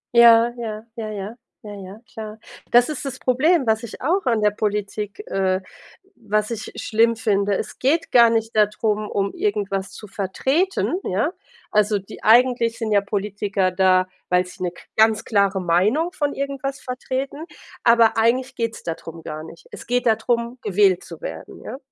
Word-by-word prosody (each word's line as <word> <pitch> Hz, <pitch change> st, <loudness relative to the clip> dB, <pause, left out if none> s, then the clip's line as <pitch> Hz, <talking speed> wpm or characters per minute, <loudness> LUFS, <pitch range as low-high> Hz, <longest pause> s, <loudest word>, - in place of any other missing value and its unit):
Ja, 235 Hz, 0 st, +7 dB
ja, 220 Hz, -1 st, -5 dB
ja, 220 Hz, -2 st, -5 dB, 0.5 s
ja, 205 Hz, -1 st, -8 dB
ja, 195 Hz, +1 st, -10 dB
klar. 215 Hz, -1 st, -7 dB, 0.3 s
Das 240 Hz, 0 st, +5 dB
ist 300 Hz, -3 st, -5 dB
das 270 Hz, -1 st, -5 dB
Problem, 275 Hz, +4 st, +2 dB
was 220 Hz, 0 st, +2 dB
ich 235 Hz, -, -9 dB
auch 355 Hz, +6 st, 0 dB
an 230 Hz, -3 st, +2 dB
der 210 Hz, -, +4 dB
Politik 210 Hz, -, -3 dB
äh, 190 Hz, -1 st, 0 dB, 0.6 s
was 215 Hz, 0 st, -1 dB
ich 220 Hz, -2 st, -5 dB
schlimm 230 Hz, +1 st, +2 dB
finde. 200 Hz, -3 st, +1 dB
Es -, -, -6 dB
geht 320 Hz, +6 st, +1 dB
gar 235 Hz, -2 st, +7 dB
nicht 225 Hz, 0 st, -1 dB
darum, 210 Hz, 0 st, +1 dB
um 200 Hz, -1 st, -1 dB
irgendwas 200 Hz, -2 st, -2 dB
zu 210 Hz, +2 st, -11 dB
vertreten, 265 Hz, -, 0 dB
ja? 225 Hz, -, -1 dB, 0.4 s
Also 210 Hz, 0 st, +3 dB
die 195 Hz, +2 st, -11 dB
eigentlich 235 Hz, 0 st, +4 dB
sind 225 Hz, -3 st, -3 dB
ja 205 Hz, -1 st, +4 dB
Politiker 200 Hz, -2 st, -1 dB
da, 185 Hz, 0 st, +3 dB, 0.2 s
weil 180 Hz, 0 st, +3 dB
sie 180 Hz, -, -13 dB
'ne 180 Hz, -1 st, -1 dB
k 175 Hz, -, -16 dB
ganz 220 Hz, -1 st, +4 dB
klare 200 Hz, -3 st, +2 dB
Meinung 200 Hz, -, +2 dB
von 290 Hz, -4 st, -1 dB
irgendwas 275 Hz, 0 st, -3 dB
vertreten, 260 Hz, +4 st, -4 dB, 0.4 s
aber 235 Hz, -1 st, +5 dB
eigentlich 250 Hz, +4 st, +1 dB
geht's 230 Hz, -1 st, -3 dB
da 165 Hz, -, -2 dB
drum 165 Hz, 0 st, -11 dB
gar 155 Hz, 0 st, -6 dB
nicht. 165 Hz, +1 st, -13 dB
Es -, -, -10 dB
geht 245 Hz, +1 st, 0 dB
da 225 Hz, -2 st, +5 dB
drum, 235 Hz, +2 st, -2 dB
gewählt 195 Hz, -3 st, +2 dB
zu -, -, -11 dB
werden, -, -, -8 dB
ja? -, -, -6 dB
220 Hz, 175 wpm, -22 LUFS, 200-245 Hz, 0.6 s, Ja